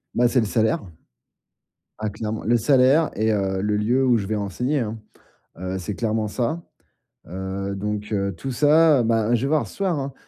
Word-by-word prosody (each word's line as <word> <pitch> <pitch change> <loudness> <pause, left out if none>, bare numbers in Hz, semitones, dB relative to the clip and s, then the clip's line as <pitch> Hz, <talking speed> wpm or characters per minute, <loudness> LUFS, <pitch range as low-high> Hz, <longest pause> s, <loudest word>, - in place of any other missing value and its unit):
Bah, 120 0 +3
c'est 125 - +2
le 110 - +1
salaire. 110 +1 +1 1.2
Ah 110 - -2
clairement. 105 +1 -5
Le 120 +1 +3
salaire 135 +6 +4
et, 110 +1 +1
heu, 95 -2 0
le 105 +1 0
lieu 120 +6 +1
où 120 -2 +4
je 100 - -3
vais 110 +2 -2
enseigner 125 +8 -1
hein, 115 -2 -3 0.6
heu, 95 +1 -3
c'est 95 +3 -5
clairement 110 -1 -1
ça. 130 +10 -2 0.7
Heu, 95 +2 -4
donc 105 +1 -4
heu, 100 -1 0
tout 135 +10 -5
ça, 150 +1 +5
bah 115 0 +1
je 115 - -1
vais 135 - 0
voir 155 +1 +1
ce - - -13
soir 190 -5 0
hein, 135 0 -4
110 Hz, 195 wpm, -23 LUFS, 105-130 Hz, 1.2 s, ça